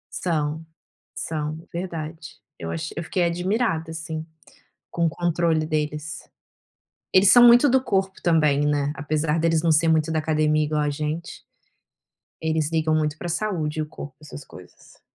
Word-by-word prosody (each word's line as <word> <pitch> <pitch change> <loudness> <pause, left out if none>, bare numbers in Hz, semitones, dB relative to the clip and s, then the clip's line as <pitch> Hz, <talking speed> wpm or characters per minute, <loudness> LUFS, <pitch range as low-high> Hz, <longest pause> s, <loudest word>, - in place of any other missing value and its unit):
São, 160 -2 -2 0.5
são, 155 +1 -4
verdade, 165 -2 -6 0.2
eu 80 - -5
acho 80 -1 -4
eu 170 - -4
fiquei 180 +3 -1
admirada 175 0 0
assim, 160 -1 -5 0.7
com 170 -1 0
o - - +3
controle 170 -1 0
deles. 155 0 -3 0.9
Eles 190 +1 +6
são 240 +4 +9
muito 240 +4 +7
do 260 0 +3
corpo 195 -5 -1
também, 150 -4 +3
né. 145 -1 +1
Apesar 150 +2 -1
deles 165 0 +2
não 165 - +2
ser 155 +2 +3
muito 160 0 +2
da 160 - 0
academia 155 -1 +1
igual 150 0 -1
a 150 - 0
gente... 155 +3 -4 1.0
eles 160 -1 0
ligam 160 -1 +1
muito 155 -1 0
para 175 - -5
saúde 170 -4 -2
e - - +1
o - - -5
corpo, 145 -2 -9
essas 150 -2 -10
coisas. 90 -1 -16
160 Hz, 160 wpm, -23 LUFS, 150-170 Hz, 1.0 s, são